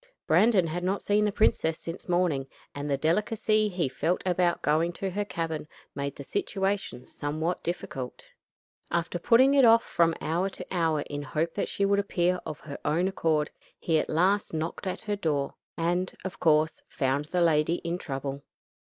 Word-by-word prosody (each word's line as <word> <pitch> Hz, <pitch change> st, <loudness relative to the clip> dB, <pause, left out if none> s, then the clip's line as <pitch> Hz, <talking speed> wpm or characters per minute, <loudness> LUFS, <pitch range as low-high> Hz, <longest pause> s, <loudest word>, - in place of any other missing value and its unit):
Brandon 210 Hz, -6 st, +4 dB
had 170 Hz, +2 st, -3 dB
not 190 Hz, +2 st, -1 dB
seen 210 Hz, +1 st, +3 dB
the 210 Hz, -, +1 dB
princess 165 Hz, -6 st, +2 dB
since 170 Hz, +2 st, -8 dB
morning, 175 Hz, -7 st, +1 dB, 0.3 s
and 145 Hz, +1 st, -4 dB
the 140 Hz, -, +1 dB
delicacy 210 Hz, +7 st, +1 dB
he 175 Hz, -6 st, 0 dB
felt 155 Hz, +7 st, 0 dB
about 180 Hz, -1 st, +1 dB
going 160 Hz, +3 st, +2 dB
to 190 Hz, +2 st, -3 dB
her 205 Hz, +3 st, -1 dB
cabin 165 Hz, -6 st, -4 dB, 0.3 s
made 140 Hz, 0 st, -3 dB
the 140 Hz, -, -8 dB
situation 195 Hz, -4 st, -2 dB
somewhat 155 Hz, +4 st, -3 dB
difficult. 155 Hz, -7 st, -5 dB, 0.6 s
After 170 Hz, +1 st, -1 dB
putting 255 Hz, +8 st, +5 dB
it 275 Hz, -1 st, +5 dB
off 230 Hz, -1 st, +7 dB
from 165 Hz, -1 st, +2 dB
hour 175 Hz, +4 st, 0 dB
to -, -, -8 dB
hour 165 Hz, -4 st, +1 dB
in 145 Hz, 0 st, -5 dB
hope 155 Hz, +4 st, -2 dB
that 205 Hz, -, -2 dB
she 200 Hz, -, 0 dB
would 200 Hz, 0 st, +3 dB
appear 180 Hz, -2 st, +1 dB
of 150 Hz, -, -6 dB
her 140 Hz, -2 st, -8 dB
own 165 Hz, +5 st, +1 dB
accord, 160 Hz, -5 st, 0 dB, 0.3 s
he 160 Hz, -2 st, +1 dB
at -, -, -2 dB
last 185 Hz, +3 st, +2 dB
knocked 160 Hz, +5 st, -3 dB
at 185 Hz, -, -3 dB
her 210 Hz, -1 st, -2 dB
door, 150 Hz, -8 st, -1 dB, 0.2 s
and, 175 Hz, +2 st, 0 dB
of 190 Hz, 0 st, -5 dB
course, 155 Hz, -1 st, +3 dB
found 140 Hz, -1 st, 0 dB
the 180 Hz, +3 st, -1 dB
lady 165 Hz, 0 st, +3 dB
in 170 Hz, +1 st, -2 dB
trouble. 140 Hz, -2 st, -4 dB
170 Hz, 175 wpm, -28 LUFS, 155-190 Hz, 0.6 s, off